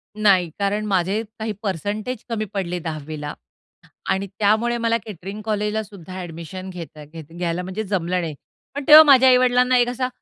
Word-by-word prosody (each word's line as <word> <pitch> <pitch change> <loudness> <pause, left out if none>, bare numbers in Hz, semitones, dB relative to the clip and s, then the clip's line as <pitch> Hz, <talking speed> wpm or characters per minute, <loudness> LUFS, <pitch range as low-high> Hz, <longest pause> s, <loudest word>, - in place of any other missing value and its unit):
नाही, 195 -5 +3
कारण 205 +2 0
माझे 195 +2 0 0.2
काही 220 0 -2
पर्सेंटेज 210 +6 -3
कमी 215 -2 -2
पडले 180 -3 -2
10वी 155 -2 -6
ला 145 - -5 0.8
आणि 195 +1 0
त्यामुळे 220 +3 +2
मला 230 0 +1
केटरिंग 200 +1 -8
कॉलेजलासुद्धा 210 -4 -3
अ‍ॅडमिशन 175 +2 -7
घेता 165 -4 -9
घेता 160 +1 -12
घ्यायला 175 0 -2
म्हणजे 190 +4 -4
जमलं 185 -2 -1
नाही. 160 -3 -4 0.4
पण 285 - -3
तेव्हा 310 +1 +11
माझ्या 265 -3 +7
आई-वडिलांना 250 0 +4
एक 240 0 +3
असा, 250 +1 -2
200 Hz, 160 wpm, -22 LUFS, 175-225 Hz, 0.8 s, तेव्हा